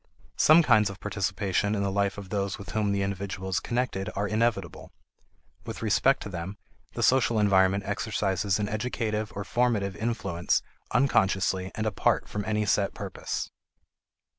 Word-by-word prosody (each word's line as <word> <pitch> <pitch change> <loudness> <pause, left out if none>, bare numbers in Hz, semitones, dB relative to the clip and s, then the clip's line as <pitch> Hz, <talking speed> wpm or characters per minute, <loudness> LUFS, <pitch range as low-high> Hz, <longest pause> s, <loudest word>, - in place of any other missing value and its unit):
Some 160 +2 +7
kinds 110 -7 +4
of 100 0 -9
participation 100 0 -1
in 100 - -1
the 100 - 0
life 100 0 0
of 100 -2 -8
those 100 -1 -2
with 100 - -9
whom 105 -2 0
the 100 -1 0
individual 95 -1 -4
is 95 - +1
connected 120 -6 -2
are 105 +1 0
inevitable; 110 -5 -1 0.7
with - - -7
respect 130 +5 +3
to - - -6
them, 90 +2 -6 0.4
the - - -2
social 125 -3 +3
environment 100 -1 +3
exercises 100 -3 0
an 105 -1 -1
educative 110 -1 -2
or 100 - -3
formative 105 -3 0
influence 100 -5 -1 0.3
unconsciously 95 -7 +2
and 110 - -2
apart 110 - +1
from 105 - -4
any 105 0 0
set 100 0 +1
purpose. - - -4
100 Hz, 155 wpm, -27 LUFS, 95-110 Hz, 0.7 s, Some